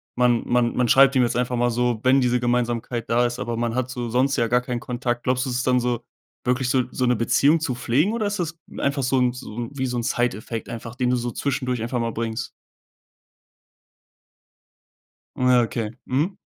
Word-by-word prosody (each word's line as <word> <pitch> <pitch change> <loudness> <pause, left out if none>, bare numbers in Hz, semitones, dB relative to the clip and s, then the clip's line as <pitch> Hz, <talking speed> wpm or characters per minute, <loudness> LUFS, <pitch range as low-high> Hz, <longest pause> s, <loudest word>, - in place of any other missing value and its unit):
man 120 -1 +3
man 120 -1 +2
man 125 -1 +2
schreibt 135 +3 +6
ihm 130 - +5
jetzt 120 - 0
einfach 125 0 0
mal 120 0 +1
so, 120 -1 0
wenn 130 +1 +4
diese 125 0 +2
Gemeinsamkeit 120 -1 -1
da 120 +1 +3
ist, 120 0 -3
aber 120 -1 -3
man 115 0 -1
hat 130 0 -1
so 120 -2 -4
sonst 130 +4 +2
ja 115 - +1
gar 125 +2 +2
keinen 125 -1 -3
Kontakt. 120 0 -3
Glaubst 125 +1 +1
du, - - -3
es 125 - -2
ist 130 - -1
dann 125 0 +4
so 120 -1 -1 0.4
wirklich 125 +1 0
so 130 -1 +3
so 130 - -1
'ne 125 - +3
Beziehung 140 +7 +3
zu 150 -5 -2
pflegen, 140 - +1
oder 220 -3 -1
ist 205 - -2
das 165 -1 -3 0.2
einfach 140 0 0
so 130 +1 +1
'n 125 -1 +2
so 125 -4 -9
'n 120 +1 -4
wie 130 -1 -2
so 125 - -2
'n 120 - -1
Side 120 -3 0
Effect 110 +1 -6
einfach, 115 0 -7
den 125 -1 0
du 125 - +3
so 120 -1 -2
zwischendurch 125 -3 -2
einfach 120 +2 -2
mal 115 0 -1
bringst? 115 0 -4 2.9
Ja, 125 -1 +4
okay. 110 -1 -3
Mhm. 155 +9 -1
125 Hz, 220 wpm, -23 LUFS, 120-130 Hz, 2.9 s, schreibt